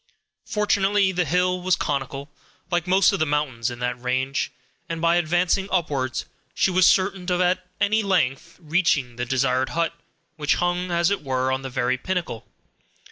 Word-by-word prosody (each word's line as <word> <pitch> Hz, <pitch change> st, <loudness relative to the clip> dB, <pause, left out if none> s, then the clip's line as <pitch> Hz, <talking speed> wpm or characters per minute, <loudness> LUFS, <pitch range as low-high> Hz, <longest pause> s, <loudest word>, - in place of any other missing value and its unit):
Fortunately, 205 Hz, -2 st, +2 dB
the 180 Hz, -1 st, 0 dB
hill 180 Hz, +3 st, +1 dB
was 185 Hz, 0 st, +2 dB
conical, 140 Hz, 0 st, -3 dB, 0.4 s
like 175 Hz, 0 st, 0 dB
most 190 Hz, +2 st, +4 dB
of 195 Hz, -, -1 dB
the 155 Hz, -, +2 dB
mountains 140 Hz, -6 st, -1 dB
in 120 Hz, -, -7 dB
that 125 Hz, 0 st, -3 dB
range, 130 Hz, +2 st, -1 dB, 0.4 s
and, 165 Hz, -1 st, -3 dB
by 170 Hz, +1 st, +3 dB
advancing 175 Hz, +3 st, +1 dB
upwards, 140 Hz, -8 st, -1 dB, 0.3 s
she 190 Hz, -, +2 dB
was 185 Hz, 0 st, +5 dB
certain 185 Hz, -1 st, +2 dB
of 180 Hz, -, +1 dB
at 180 Hz, 0 st, +2 dB, 0.2 s
length 190 Hz, -8 st, 0 dB
reaching 155 Hz, -7 st, 0 dB
the 125 Hz, -, -2 dB
desired 130 Hz, 0 st, +1 dB
hut, 170 Hz, 0 st, +1 dB, 0.4 s
which 150 Hz, -1 st, +1 dB
hung, 175 Hz, +1 st, -1 dB
as 170 Hz, +1 st, +2 dB
it 200 Hz, -, -1 dB
were, 130 Hz, -1 st, 0 dB
on 130 Hz, 0 st, -1 dB
the 135 Hz, -, -6 dB
very 125 Hz, 0 st, 0 dB
pinnacle. 175 Hz, -9 st, -3 dB
170 Hz, 165 wpm, -23 LUFS, 130-185 Hz, 0.4 s, was